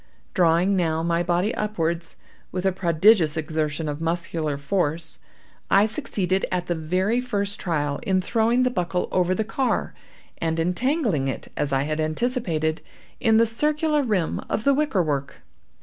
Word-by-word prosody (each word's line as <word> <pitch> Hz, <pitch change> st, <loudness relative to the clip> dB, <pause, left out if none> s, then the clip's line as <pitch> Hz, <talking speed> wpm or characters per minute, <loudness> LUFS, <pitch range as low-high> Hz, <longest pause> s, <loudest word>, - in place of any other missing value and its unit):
Drawing 175 Hz, +2 st, +3 dB
now 165 Hz, -3 st, 0 dB
my 170 Hz, 0 st, +1 dB
body 175 Hz, +5 st, +1 dB
upwards, 170 Hz, -5 st, -2 dB, 0.4 s
with 185 Hz, 0 st, -3 dB
a 190 Hz, -, +4 dB
prodigious 175 Hz, -2 st, +3 dB
exertion 155 Hz, 0 st, -2 dB
of 145 Hz, +1 st, -4 dB
muscular 165 Hz, -3 st, -2 dB
force, 160 Hz, +2 st, -1 dB, 0.5 s
I 200 Hz, +1 st, +5 dB
succeeded, 195 Hz, -3 st, -1 dB
at 180 Hz, -1 st, -1 dB
the 175 Hz, -, 0 dB
very 185 Hz, +9 st, 0 dB
first 205 Hz, -5 st, -2 dB
trial, 145 Hz, -4 st, -1 dB
in 190 Hz, -1 st, +1 dB
throwing 230 Hz, +5 st, +2 dB
the 250 Hz, -, +2 dB
buckle 180 Hz, -4 st, -1 dB
over 185 Hz, 0 st, +2 dB
the 220 Hz, -, 0 dB
car, 250 Hz, +4 st, -1 dB, 0.5 s
and 165 Hz, 0 st, -1 dB
entangling 180 Hz, -, 0 dB
it, 135 Hz, -, -5 dB
as 145 Hz, -1 st, -1 dB
I 135 Hz, 0 st, +2 dB
had 155 Hz, +1 st, -2 dB
anticipated, 160 Hz, -, -1 dB, 0.4 s
in 225 Hz, -2 st, +4 dB
the 230 Hz, -, +5 dB
circular 300 Hz, +6 st, +1 dB
rim 205 Hz, -, 0 dB
of 215 Hz, -, -1 dB
the 280 Hz, -, +4 dB
wicker 275 Hz, -10 st, +1 dB
work. 140 Hz, -3 st, -3 dB
180 Hz, 155 wpm, -24 LUFS, 160-215 Hz, 0.5 s, I